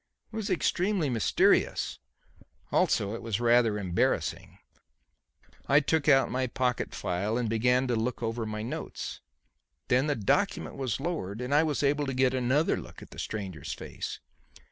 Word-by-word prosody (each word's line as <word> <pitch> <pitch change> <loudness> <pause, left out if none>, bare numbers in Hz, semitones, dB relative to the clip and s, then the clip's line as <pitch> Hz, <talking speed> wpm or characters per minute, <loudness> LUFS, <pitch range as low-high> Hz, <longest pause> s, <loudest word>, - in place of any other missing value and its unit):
It - - -7
was 220 -2 -3
extremely 180 -3 +1
mysterious. 115 -3 +2 0.7
Also, 100 +1 +2
it 115 - -5
was 115 -2 -2
rather 120 -2 +4
embarrassing. 90 -3 -1 1.1
I 140 +1 +6
took 155 +1 +1
out 135 -2 +5
my 130 0 0
pocket 125 0 -1
file 100 +6 -1
and 120 -2 0
began 125 +4 +2
to 125 -2 0
look 115 +2 -2
over 115 0 -2
my 110 0 -4
notes. 115 - -5 0.7
Then 130 +4 +3
the 145 - +1
document 195 - 0
was 130 -5 -2
lowered 135 - -3
and 125 +3 -2
I 150 - +6
was 155 -2 0
able 145 +1 +2
to 135 - -2
get 130 0 +3
another 130 +4 +2
look - - -10
at - - -15
the - - -10
stranger's 95 -9 -5
face. - - -6
125 Hz, 160 wpm, -29 LUFS, 110-145 Hz, 1.1 s, I